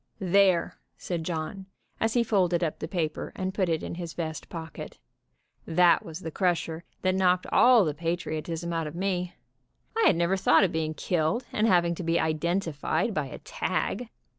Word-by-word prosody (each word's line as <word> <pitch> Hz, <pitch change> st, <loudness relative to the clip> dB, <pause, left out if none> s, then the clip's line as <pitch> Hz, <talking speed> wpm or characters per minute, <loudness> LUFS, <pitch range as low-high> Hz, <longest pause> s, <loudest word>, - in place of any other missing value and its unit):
"There," 190 Hz, -2 st, +2 dB, 0.2 s
said 170 Hz, -3 st, -4 dB
John, 175 Hz, +4 st, -4 dB, 0.3 s
as 225 Hz, +1 st, 0 dB
he 240 Hz, -, +4 dB
folded 180 Hz, -6 st, +2 dB
up 160 Hz, -, -2 dB
the -, -, -4 dB
paper 160 Hz, -3 st, -3 dB
and 190 Hz, 0 st, -3 dB
put 190 Hz, -3 st, 0 dB
it 160 Hz, -1 st, 0 dB
in -, -, -5 dB
his 170 Hz, -1 st, -6 dB
vest 160 Hz, -2 st, -5 dB
pocket, 160 Hz, -3 st, -8 dB, 0.7 s
"that 170 Hz, +1 st, +4 dB
was 165 Hz, +2 st, -8 dB
the 160 Hz, -, -5 dB
crusher 170 Hz, -2 st, -1 dB, 0.2 s
that 185 Hz, 0 st, +2 dB
knocked 185 Hz, -1 st, +2 dB
all 245 Hz, -5 st, +6 dB
the 150 Hz, -, -1 dB
patriotism 165 Hz, 0 st, -3 dB
out 165 Hz, -2 st, -1 dB
of 150 Hz, -, -8 dB
me. 180 Hz, -1 st, -2 dB, 0.6 s
I 450 Hz, -1 st, +3 dB
had -, -, +5 dB
never 170 Hz, +3 st, +1 dB
thought 190 Hz, -, +5 dB
of 185 Hz, -, +2 dB
being 155 Hz, -1 st, -2 dB
killed, 170 Hz, -, 0 dB
and 215 Hz, +1 st, +2 dB
having 175 Hz, -3 st, +3 dB
to 175 Hz, -, -6 dB
be 165 Hz, 0 st, +1 dB
identified 165 Hz, +3 st, 0 dB
by 150 Hz, -6 st, -1 dB
a -, -, -8 dB
tag. 235 Hz, +2 st, -3 dB
170 Hz, 180 wpm, -27 LUFS, 160-190 Hz, 0.7 s, all